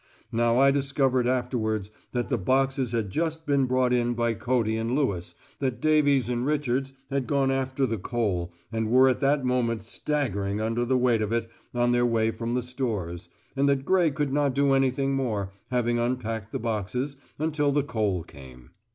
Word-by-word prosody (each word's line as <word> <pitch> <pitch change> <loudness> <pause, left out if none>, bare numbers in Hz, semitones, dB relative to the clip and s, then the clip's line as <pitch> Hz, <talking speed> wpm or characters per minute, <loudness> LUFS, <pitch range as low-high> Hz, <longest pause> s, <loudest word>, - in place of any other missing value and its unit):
Now 115 +1 +2
I 135 +1 +6
discovered 135 -3 +1
afterwards 115 -5 -1 0.2
that 120 -1 -1
the - - +1
boxes 130 +4 +1
had 110 -5 -1
just 160 - -2
been 140 -2 +2
brought 130 0 +2
in 120 0 +1
by 120 0 +1
Cody 115 0 0
and 115 +3 -1
Lewis, 90 -12 -1 0.2
that 130 -3 -1
Davies 145 -4 +3
and 120 0 -1
Richards 135 -2 0 0.2
had 135 -3 -1
gone 135 0 +2
after 135 0 0
the 115 -4 -2
coal, 95 -5 -1 0.2
and 110 -1 -1
were 130 +2 +6
at 125 - 0
that 140 -1 +2
moment 120 -3 0
staggering 110 -6 -2
under 115 +2 0
the 130 +1 +2
weight 125 -3 +2
of 105 0 -1
it 115 -1 -1 0.2
on 120 0 +2
their 120 0 +3
way 115 -1 +1
from 115 +1 -3
the 125 - 0
stores, 110 -9 -3 0.3
and 140 +1 +2
that 135 -1 +1
Gray 185 -3 +3
could 145 -1 -2
not 145 -2 +1
do 140 0 +3
anything 135 0 +2
more, 110 -8 -1 0.2
having 120 -1 +1
unpacked 115 -3 -2
the - - -2
boxes, 115 +5 -2 0.2
until 150 -2 +1
the 145 0 +2
coal 105 - -1
came. 65 -6 -14
125 Hz, 185 wpm, -26 LUFS, 115-135 Hz, 0.3 s, I